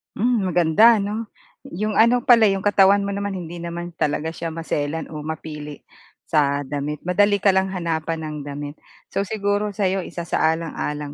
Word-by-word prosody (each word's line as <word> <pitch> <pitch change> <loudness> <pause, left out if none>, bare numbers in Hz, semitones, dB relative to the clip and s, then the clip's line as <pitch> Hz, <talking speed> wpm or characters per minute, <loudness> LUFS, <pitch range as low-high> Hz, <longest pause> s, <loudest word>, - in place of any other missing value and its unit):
Mm, 225 -3 +1
maganda 180 +6 +5
'no? 210 +2 -3 0.4
'Yong 210 +3 -2
ano 240 +2 +4
pala, 235 -4 +6
'yong 195 -1 0
katawan 200 -1 +4
mo 200 - -2
naman 200 0 -3
hindi 175 -1 -7
naman 170 +1 -6
talaga 155 +2 0
siya 165 - -5
maselan 160 -1 -3
o 155 - -6
mapili 150 -1 -7 0.4
sa 145 -2 +1
damit. 145 +1 -4
Madali 205 +3 +3
ka 200 0 +3
lang 190 0 +2
hanapan 165 -3 -3
ng 150 -1 -5
damit. 145 +1 -7 0.3
So 200 0 -1
siguro 205 0 -1
sa'yo 195 -1 0
isasaalang-alang 160 -3 -2
175 Hz, 155 wpm, -22 LUFS, 155-200 Hz, 0.4 s, pala